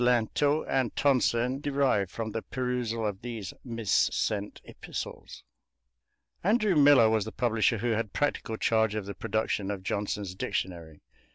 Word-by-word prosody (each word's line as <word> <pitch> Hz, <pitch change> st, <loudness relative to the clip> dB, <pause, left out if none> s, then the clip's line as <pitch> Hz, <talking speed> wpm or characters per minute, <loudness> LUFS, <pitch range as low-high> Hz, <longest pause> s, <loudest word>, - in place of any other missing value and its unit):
Lintot 125 Hz, +5 st, +2 dB
and 130 Hz, -4 st, 0 dB
Tonson 130 Hz, -1 st, +2 dB
derived 135 Hz, -10 st, +1 dB
from 110 Hz, +2 st, -4 dB
the 115 Hz, -, -3 dB
perusal 125 Hz, -3 st, -2 dB
of 100 Hz, -2 st, -3 dB
these 115 Hz, -6 st, -6 dB
missent 110 Hz, -3 st, 0 dB
epistles. -, -, -8 dB, 1.0 s
Andrew 210 Hz, 0 st, +3 dB
Millar 145 Hz, -5 st, +7 dB
was 110 Hz, -2 st, +2 dB
the 110 Hz, -, -6 dB
publisher 115 Hz, -1 st, +1 dB
who 120 Hz, +3 st, -1 dB
had 110 Hz, -2 st, -1 dB
practical 135 Hz, -6 st, -1 dB
charge 110 Hz, -2 st, +2 dB
of 105 Hz, -2 st, -3 dB
the 100 Hz, -, -5 dB
production 100 Hz, 0 st, -2 dB
of 100 Hz, -2 st, -4 dB
Johnson's 100 Hz, -1 st, -2 dB
dictionary. 85 Hz, -4 st, -4 dB
115 Hz, 135 wpm, -28 LUFS, 105-125 Hz, 1.0 s, Millar